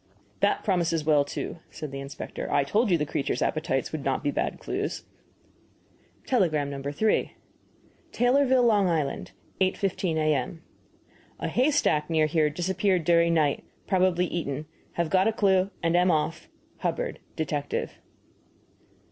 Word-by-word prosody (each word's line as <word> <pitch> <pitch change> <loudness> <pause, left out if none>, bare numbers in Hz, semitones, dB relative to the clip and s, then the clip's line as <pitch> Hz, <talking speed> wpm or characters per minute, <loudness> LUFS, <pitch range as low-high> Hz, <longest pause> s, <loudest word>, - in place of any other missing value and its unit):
"That - - +2
promises 170 -5 +1
well, 150 -2 +4
too," 155 +3 -5
said 155 -3 -7
the 135 - -5
inspector. 135 +1 -6
"I - - +3
told 210 - +1
you 175 - +4
the 150 - -1
creature's 140 - -1
appetites 155 -4 -1
would 155 -3 -4
not 135 -1 -1
be 145 - +1
bad - - -2
clues." - - -3 1.2
Telegram 155 - +1
No. 140 -1 -5
3: 145 +10 0 0.8
TAYLORVILLE, 250 0 +4
L. 200 -3 +3
I. 160 -3 +2
8.15 185 +4 -2
A.M. 155 +1 0 0.8
A - - -2
haystack 250 - +2
near 160 -2 +3
here 155 0 +2
disappeared 185 +3 0
during 170 +1 +4
night. 150 -3 +1 0.2
Probably 185 -2 +2
eaten. 155 -4 -3 0.3
Have 170 -2 -1
got 190 +2 +4
a - - +3
clue, 195 -3 +2
and 165 +1 +2
am 180 +1 +4
off. 155 0 -1 0.3
HUBBARD, - - -2 0.2
Detective. 145 -2 -3
165 Hz, 140 wpm, -27 LUFS, 150-190 Hz, 1.2 s, well